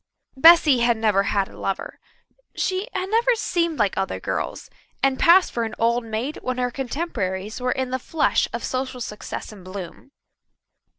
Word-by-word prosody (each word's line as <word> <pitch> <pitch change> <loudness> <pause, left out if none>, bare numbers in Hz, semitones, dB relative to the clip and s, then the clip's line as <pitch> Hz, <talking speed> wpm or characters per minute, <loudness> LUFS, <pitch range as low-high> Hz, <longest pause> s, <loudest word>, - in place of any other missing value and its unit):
Bessy 315 -2 +7
had 235 -1 +2
never 215 -3 +2
had 200 -2 +1
a - - -15
lover. 195 - -4 0.6
She 375 +3 -1
had 375 +1 -3
never 475 +2 +3
seemed 340 -7 -1
like 210 -3 +1
other 195 0 -2
girls, - - -4 0.4
and 270 -1 +2
passed 360 +2 +6
for 235 - -1
an 225 -1 -4
old 235 +1 +1
maid 225 +7 -4
when 255 0 -3
her 250 -1 0
contemporaries 230 - -3
were 250 0 0
in 260 -1 -2
the 260 - -1
flush 310 +4 +1
of - - -5
social 260 0 -3
success 210 -2 -6
and 200 -4 -13
bloom. 185 +7 -9
250 Hz, 170 wpm, -23 LUFS, 215-320 Hz, 0.6 s, Bessy